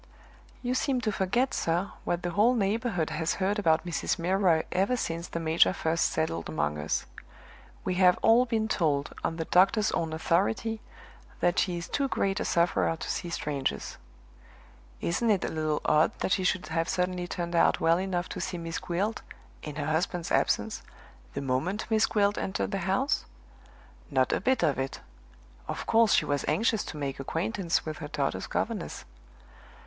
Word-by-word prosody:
"You 245 0 0
seem 260 0 +1
to 215 - 0
forget, 240 +7 0
sir, 175 +4 0
what 175 0 -1
the 175 - -1
whole 220 +7 +4
neighborhood 200 -6 0
has 160 +1 -1
heard 200 +2 0
about 160 -3 +2
Mrs. 175 - -1
Milroy 175 -2 +2
ever 195 +7 +1
since 170 -5 -3
the 170 - -4
major 165 +2 +3
first 165 -2 0
settled 120 - -1
among 75 -1 -1
us. 75 +1 -1 0.8
We 185 - 0
have 180 -1 +6
all 235 +3 +6
been 220 -2 0
told, 145 -8 0
on 165 - -1
the 165 -1 -3
doctor's 195 +5 +4
own 165 -1 -1
authority, 200 +7 0 0.6
that 175 0 +2
she 180 -5 0
is 170 - -5
too 280 -1 0
great 195 -5 0
a - - -2
sufferer 170 -1 +2
to - - -4
see 175 - -3
strangers. 140 - -3 1.0
Isn't 225 +7 0
it 200 -4 +2
a - - -2
little 155 -1 -1
odd 155 +1 +3
that - - -1
she 190 - +2
should 185 -2 +1
have 165 +1 -1
suddenly 180 -1 -1
turned 175 -1 -3
out 165 - +4
well 165 +1 +3
enough 185 -2 -2
to - - -5
see 180 - -3
Miss 165 -1 -4
Gwilt 195 +6 -2 0.4
(in 150 -2 -7
her 145 -1 -3
husband's 165 +2 -1
absence) - - +1 0.5
the 140 - -2
moment 140 +10 -1
Miss 220 0 +4
Gwilt 205 -1 +1
entered 195 +1 -2
the 195 - -1
house?" 265 +9 +1 0.8
"Not - - +2
a - - 0
bit 260 0 +2
of 140 -3 +2
it! 135 0 -3 0.7
Of - - -4
course 225 -2 +4
she - - +4
was 145 -1 -1
anxious 225 -1 +2
to 155 - -7
make 140 -2 -3
acquaintance 170 +5 -1
with 155 -1 -5
her 150 - -5
daughter's 145 -2 -2
governess." - - -3
175 Hz, 175 wpm, -28 LUFS, 160-205 Hz, 1.0 s, have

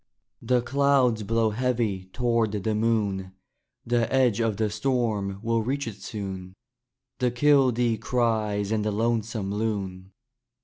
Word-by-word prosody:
The 125 +1 +1
clouds 135 -4 +2
blow 110 +1 +1
heavy 115 -5 -1
toward 115 +1 0
the 105 +1 -1
moon. 105 -4 0 0.5
The 120 -1 +1
edge 125 -5 +3
of 115 -3 0
the 110 -1 0
storm 110 -6 -1
will 115 0 +1
reach 135 +4 -2
it 110 -2 -7
soon. 95 -3 -6 0.6
The 125 - +2
kildee 125 -3 +3
cries 110 -4 0
and 110 -1 +1
the 105 - 0
lonesome 110 -2 -1
loon. 100 -3 -3
110 Hz, 130 wpm, -26 LUFS, 105-120 Hz, 0.6 s, edge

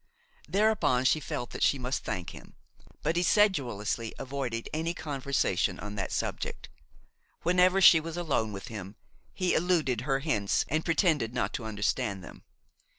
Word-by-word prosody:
Thereupon 200 - +2
she 155 - +4
felt 120 -4 -5
that - - -7
she 140 - +4
must 125 +1 -3
thank 90 -2 -4
him; - - -13 0.5
but 160 +3 0
he 175 - +2
sedulously 125 - +1
avoided 130 -4 -4
any 165 +2 -1
conversation 140 -3 -1
on 105 0 -6
that 100 -2 -3
subject; - - -3 0.7
whenever 180 +2 +4
she 170 -2 +9
was 165 +1 -6
alone 140 -11 0
with 100 -1 -7
him, 100 -2 -7 0.4
he 185 -2 0
eluded 155 -9 +1
her 135 +1 +1
hints 105 -10 +1
and 155 +4 0
pretended 155 - +1
not - - -1
to 115 - -4
understand 105 -1 -1
them. - - -12
135 Hz, 150 wpm, -29 LUFS, 115-165 Hz, 0.7 s, she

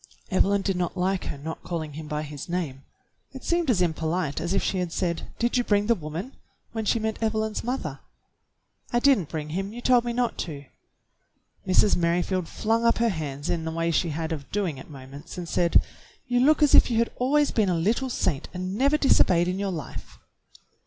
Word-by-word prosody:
Evelyn 195 +1 +3
did 195 -1 0
not 180 +1 -2
like 185 +1 0
her - - -4
not 160 +3 -6
calling 160 -4 -4
him 155 +1 -7
by 150 0 -2
his 145 +1 -8
name. 160 -7 -3 0.5
It 265 - -9
seemed 340 -3 +1
as 190 -7 +3
impolite 160 -2 -1
as 170 +1 -2
if 195 - +1
she 190 - 0
had 180 -2 -2
said, 170 -1 -2
"Did 240 +2 +1
you 245 - +2
bring 205 -2 +2
the 235 - +4
woman 170 - -5
.f^" - - -30 0.4
when 225 -1 -3
she 230 - +2
meant 220 0 -2
Evelyn's 220 -1 -1
mother. 250 +3 -3 0.9
"I 240 - +2
did 270 0 +5
n't 165 - -6
bring 155 -1 -4
him. 195 +5 -3
You 240 - -7
told 245 -1 +4
me 240 - -2
not 240 0 -1
to." 145 -4 -5 1.0
Mrs. 185 +2 +4
Merrifield 175 +1 0
flung 225 +1 0
up 230 0 +4
her 235 0 +2
hands 145 -6 -4
in 165 -1 -1
a - - -2
way 165 +1 0
she 170 +1 +1
had 160 +2 -3
of 145 -3 -5
doing 185 -9 -1
at 130 - -12
moments, 140 +3 -10
and 175 -1 -5
said, 170 0 +3 0.5
"You 245 -1 +1
look 300 +4 +5
as 295 - +4
if - - +7
you 230 - 0
had 230 0 +2
always 290 +4 +2
been 215 -4 +2
a 180 - +2
little 220 +10 +1
saint 165 - -1
and 185 +1 -3
never 280 +7 +3
disobeyed 180 - +4
in 185 +1 -1
your 200 -1 -1
life." 155 -8 -7
185 Hz, 215 wpm, -26 LUFS, 160-230 Hz, 1.0 s, if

